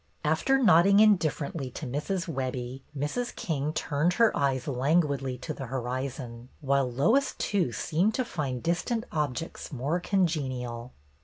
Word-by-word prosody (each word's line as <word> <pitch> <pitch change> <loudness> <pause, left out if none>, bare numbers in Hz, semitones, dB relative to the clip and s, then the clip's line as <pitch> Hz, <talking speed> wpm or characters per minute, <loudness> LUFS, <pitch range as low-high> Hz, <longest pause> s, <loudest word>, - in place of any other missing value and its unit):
After 160 - +2
nodding 200 -4 +6
indifferently 165 -8 +2
to - - -6
Mrs. 160 +8 -2
Webbie, 130 -3 -4 0.2
Mrs. 235 - -2
King 155 - -2
turned 155 +3 0
her 230 +3 +3
eyes 135 -3 0
languidly 140 -1 +1
to 155 +6 -5
the 135 -3 -7
horizon, 125 -1 -4
while 140 -3 +1
Lois, 225 - +2
too, 185 -11 0
seemed 175 - 0
to 255 - 0
find 135 - -3
dis 170 +1 +1
tant 235 -2 -2
objects 150 +2 -3
more 145 +6 -1
congenial. 130 -11 -1
145 Hz, 140 wpm, -28 LUFS, 130-175 Hz, 0.2 s, nodding